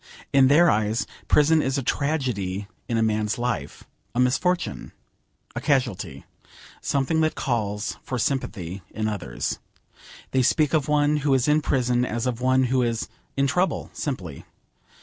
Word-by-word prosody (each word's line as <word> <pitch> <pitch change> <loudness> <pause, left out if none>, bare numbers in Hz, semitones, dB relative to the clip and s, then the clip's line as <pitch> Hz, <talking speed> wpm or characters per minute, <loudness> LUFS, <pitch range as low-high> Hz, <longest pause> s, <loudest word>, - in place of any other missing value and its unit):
In 135 -1 +6
their 165 +5 +6
eyes 110 +2 0 0.2
prison 155 +2 +4
is 135 0 0
a 135 - -1
tragedy 120 -10 -1 0.2
in 115 - +1
a 115 - +3
man's 110 -1 0
life, 120 - -3 0.3
a - - 0
misfortune, 135 +9 0 0.6
a - - -3
casuality, 110 - -1 0.6
something 140 +3 +1
that 155 0 +1
calls 105 -5 -2
for 125 - -4
sympathy 100 -7 -2
in 110 0 -3
others. 100 - -3 0.7
They 130 - +3
speak 150 +4 +2
of 150 -4 +2
one 150 0 +3
who 145 -2 +2
is 130 +1 +1
in 150 +1 +4
prison 125 -3 +1
as 120 -1 -2
of 125 -1 -2
one 130 +1 +3
who 130 0 +2
is 115 -2 -1 0.3
'in 140 - +3
trouble' 180 +7 0
simply. 90 - -5
125 Hz, 150 wpm, -24 LUFS, 110-145 Hz, 0.7 s, In